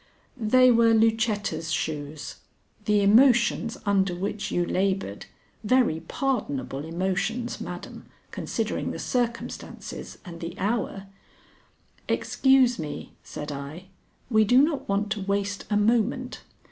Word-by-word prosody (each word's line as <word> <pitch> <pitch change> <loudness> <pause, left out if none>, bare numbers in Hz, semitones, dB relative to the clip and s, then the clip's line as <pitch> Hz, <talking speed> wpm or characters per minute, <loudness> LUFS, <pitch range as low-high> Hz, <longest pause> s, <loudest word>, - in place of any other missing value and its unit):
"They 255 +2 +5
were 230 -1 +5
Lucetta's 215 -7 +1
shoes. 145 -2 -4 0.5
The 210 -1 +3
emotions 235 +1 +4
under 195 -3 +2
which 200 +3 -3
you 175 - 0
labored 190 - -1 0.4
very 230 -8 +3
pardonable 160 - -2
emotions, 190 +8 -2
madam, - - -8 0.2
considering - - -2
the - - -4
circumstances 240 -2 -4
and 170 -2 -9
the 170 +2 -6
hour 200 -1 -2 0.5
" - - -35
"Excuse 265 -4 +3
me," 150 -2 -6
said 150 0 -7
I. 145 +6 -7 0.4
"We 220 -1 +5
do 245 +5 +5
not 295 -6 -1
want 200 +1 0
to 215 -2 -1
waste 200 +1 -2
a 210 - +2
moment. 240 +4 +1
205 Hz, 120 wpm, -26 LUFS, 175-235 Hz, 0.5 s, They